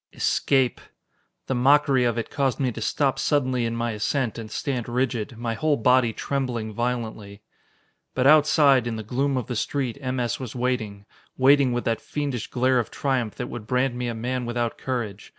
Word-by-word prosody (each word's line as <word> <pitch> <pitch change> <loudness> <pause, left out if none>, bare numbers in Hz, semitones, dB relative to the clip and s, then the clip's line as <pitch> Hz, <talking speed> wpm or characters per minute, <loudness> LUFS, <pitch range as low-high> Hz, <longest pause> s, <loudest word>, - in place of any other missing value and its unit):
Escape! 135 -3 +1 0.6
The - - -2
mockery 135 0 +4
of 120 -1 0
it 115 - -3
caused 140 -3 0
me 130 -3 +1
to 115 - -7
stop 135 +4 0
suddenly 130 -5 +1
in 115 - -3
my 115 0 -1
ascent 115 +2 -1
and 110 -1 -7
stand 125 0 -3
rigid, 120 -2 -1
my 115 0 -2
whole 145 +6 +1
body 125 +1 +3
trembling 120 -4 -3
violently. 110 -4 -4 0.7
But 130 - +1
outside, 145 -4 +5
in 115 - -2
the 110 - -5
gloom 135 +5 0
of 125 - -2
the 125 - -4
street, 130 +2 -2
M. 130 -1 -2
S. 120 -2 -1
was 130 -3 -7
waiting, 115 -5 -2 0.3
waiting 135 0 +5
with 120 0 -2
that 115 -1 0
fiendish 140 -6 -3
glare 130 +1 +2
of 115 - -2
triumph 130 -6 -1
that - - -4
would 110 -3 -8
brand 125 +1 +1
me 125 0 -3
a 120 - -3
man 125 +2 -3
without 120 -1 -1
courage. 115 -6 -4
125 Hz, 185 wpm, -24 LUFS, 115-135 Hz, 0.7 s, outside